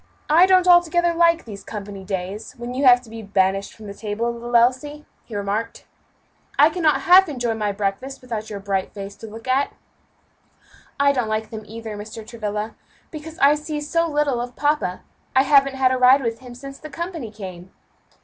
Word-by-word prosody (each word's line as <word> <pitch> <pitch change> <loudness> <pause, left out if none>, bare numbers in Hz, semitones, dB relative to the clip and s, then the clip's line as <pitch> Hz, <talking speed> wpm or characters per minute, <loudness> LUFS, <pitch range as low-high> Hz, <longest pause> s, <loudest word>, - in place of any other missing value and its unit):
"I 340 +4 +7
don't 370 -1 +4
altogether 345 -1 +4
like 335 0 +3
these 200 -3 -9
company 200 -2 -7
days, 190 +2 -5
when 240 -2 -7
you 270 +2 -1
have 245 -1 +7
to 230 - -15
be 225 0 -7
banished 195 -1 0
from 220 - -13
the 200 - -7
table, 220 +3 -3
little 240 +1 -5
Elsie," 260 +5 +2 0.2
he 225 - -9
remarked. 205 +3 -3 0.7
"I 295 +3 +6
cannot 315 -3 +2
half 370 +1 +6
enjoy 245 -5 -2
my 210 -2 -1
breakfast 200 +7 -3
without 225 -3 -6
your 205 -2 -5
bright 195 0 -3
face 200 0 -7
to 225 - -9
look 225 +3 -11
at." 265 +2 +1 1.3
"I 280 0 +5
don't 250 -5 -1
like 215 0 -2
them 220 -1 -6
either, 225 0 -7
Mr. 215 +2 -8
Travilla, 215 -1 -4 0.4
because 315 +1 -9
I 280 +1 +5
see 300 0 -4
so 335 +3 0
little 290 -5 0
of 245 0 -6
papa. 290 -11 0 0.3
I 265 - +6
haven't 275 -1 +4
had 260 -1 +3
a 260 - +1
ride 260 +2 +6
with 230 -1 -2
him 250 -1 -11
since 275 +2 -10
the 310 - -9
company 335 - -5
came." 190 -4 -9
240 Hz, 190 wpm, -22 LUFS, 210-290 Hz, 1.3 s, I